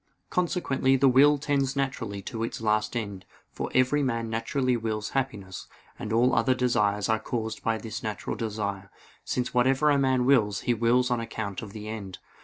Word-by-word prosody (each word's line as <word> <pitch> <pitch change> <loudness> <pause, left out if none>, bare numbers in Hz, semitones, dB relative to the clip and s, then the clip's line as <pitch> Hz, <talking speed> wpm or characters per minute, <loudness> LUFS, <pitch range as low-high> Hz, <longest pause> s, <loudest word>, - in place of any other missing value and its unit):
Consequently 150 -7 +1
the 135 +1 +4
will 140 +3 +6
tends 140 -1 0
naturally 115 -8 -3
to 115 +3 -5
its 115 - -4
last 110 +1 0
end; 100 -4 -5 0.3
for - - -4
every 130 +3 +3
man 115 -4 -1
naturally 125 +3 0
wills 110 -2 -3
happiness: 105 -9 -3 0.3
and 105 - -5
all 120 +3 +3
other 130 -1 +3
desires 105 -5 +1
are 110 -1 +2
caused 110 0 -4
by 115 0 0
this 110 +1 -6
natural 110 -4 -4
desire; 100 -3 -4 0.3
since 125 0 -2
whatever 135 +4 +3
a 140 - +3
man 130 -2 +2
wills 110 -7 +3
he 120 - +1
wills 120 +2 +2
on 120 - +1
account 105 -4 -4
of 105 - -8
the 105 0 -8
end. 100 -4 -6
115 Hz, 180 wpm, -27 LUFS, 105-130 Hz, 0.3 s, will